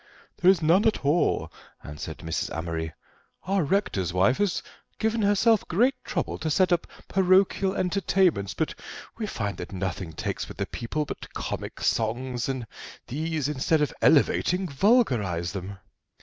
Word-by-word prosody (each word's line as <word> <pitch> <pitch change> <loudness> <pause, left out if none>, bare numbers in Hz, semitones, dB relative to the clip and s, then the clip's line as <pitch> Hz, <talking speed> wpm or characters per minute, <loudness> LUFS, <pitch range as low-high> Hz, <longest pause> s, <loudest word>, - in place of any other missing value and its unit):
"There 180 - +5
is 185 -4 +4
none 175 +7 +4
at 215 - 0
all," 150 +5 +2 0.3
answered 75 0 -7
Mrs. 80 - -2
Amory; 80 -1 -3 0.5
"our 195 -1 +1
rector's 145 - 0
wife 95 +8 +3
has 205 -3 0 0.3
given 220 0 0
herself 205 +2 +3
great 240 +10 +3
trouble - - -3
to 160 - -2
get 185 +3 +3
up 170 - 0 0.2
parochial 190 0 +3
entertainments, 185 - +1
but 160 - -1 0.5
we 215 - -2
find 100 - -3
that - - -7
nothing 95 -3 -4
takes - - -3
with - - -10
the - - -1
people 150 +6 -3
but - - -8
comic - - -5
songs, 120 +2 -1
and 130 -3 -3 0.4
these, 155 +1 -2
instead 150 +2 +1
of 150 - -2
elevating, 180 +5 +3
vulgarise 130 - +2
them." 95 0 -6
155 Hz, 150 wpm, -26 LUFS, -, 0.5 s, There